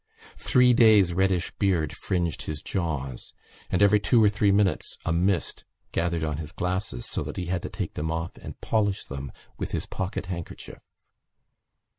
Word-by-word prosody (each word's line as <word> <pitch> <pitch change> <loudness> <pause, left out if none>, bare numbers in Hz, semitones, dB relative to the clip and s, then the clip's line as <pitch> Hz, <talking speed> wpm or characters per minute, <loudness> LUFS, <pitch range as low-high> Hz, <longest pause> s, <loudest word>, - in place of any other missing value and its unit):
Three 125 -2 +5
days' 110 -7 +6
reddish 95 -1 +1
beard 85 -8 +1
fringed 85 -4 -1
his 75 -1 -5
jaws 70 -9 -3 0.3
and 95 - +3
every 105 +1 +5
two 115 +2 +4
or 105 - +6
three 105 0 +2
minutes 100 -1 +1
a 80 - +1
mist 90 +2 0 0.3
gathered 85 -1 0
on 75 -2 -1
his 80 -1 -6
glasses 90 - -2
so - - -3
that - - -6
he 90 - -2
had 90 0 -1
to - - -5
take 95 -3 -4
them 80 +1 -3
off 80 +1 -3
and - - -9
polish 105 -3 0
them 70 -1 -7 0.3
with - - -4
his - - -1
pocket 95 +1 -4
handkerchief. 85 -2 -7
90 Hz, 170 wpm, -26 LUFS, 80-100 Hz, 0.3 s, days